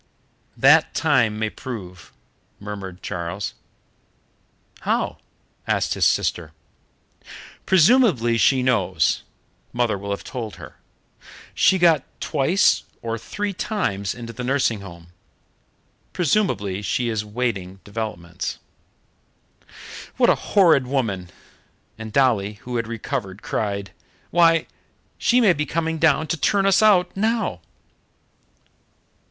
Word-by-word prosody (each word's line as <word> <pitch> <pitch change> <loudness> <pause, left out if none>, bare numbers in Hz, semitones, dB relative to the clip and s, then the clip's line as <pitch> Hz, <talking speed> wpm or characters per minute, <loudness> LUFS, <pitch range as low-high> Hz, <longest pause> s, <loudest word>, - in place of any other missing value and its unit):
"That - - +5
time 125 -9 +2
may 110 0 -2
prove," 95 -9 -8 0.5
murmured 100 -3 -8
Charles. 85 +4 -4 1.3
"How?" - - -1 0.5
asked - - +1
his - - +1
sister. 80 -3 -1 1.1
"Presumably 170 - +4
she 130 0 +3
knows 95 -10 +1 0.5
mother 120 -5 0
will 100 +1 -7
have 100 - -3
told 115 -4 -6
her. - - -12 0.8
She 190 - +4
got 165 -6 +4 0.2
twice 160 +6 +2 0.2
or 115 0 -3
three 205 - -4
times 140 - -2
into 115 -1 -8
the 125 - -6
nursing 125 -5 0
home. 85 -3 -12 1.0
Presumably 135 - 0
she 120 +4 -1
is 110 -3 -1
awaiting 105 -4 -3
developments." 100 -5 -5 1.6
"What - - +5
a - - +3 0.2
horrid 165 -10 +5
woman!" 110 -10 -2 0.7
And 110 -1 -7
Dolly, 110 -5 +2
who 125 -1 -3
had 115 -1 -2
recovered, 110 -3 -5
cried, 100 -2 -3 0.4
"Why, 165 -1 +4 0.5
she 250 - +3
may 210 -7 +5
be 150 -2 -3
coming 160 +1 -2
down 155 -1 +3
to 165 - -2
turn 195 +6 +2
us 195 0 +4
out 190 -5 +4
now!" 220 - -1
120 Hz, 110 wpm, -22 LUFS, 100-165 Hz, 1.6 s, That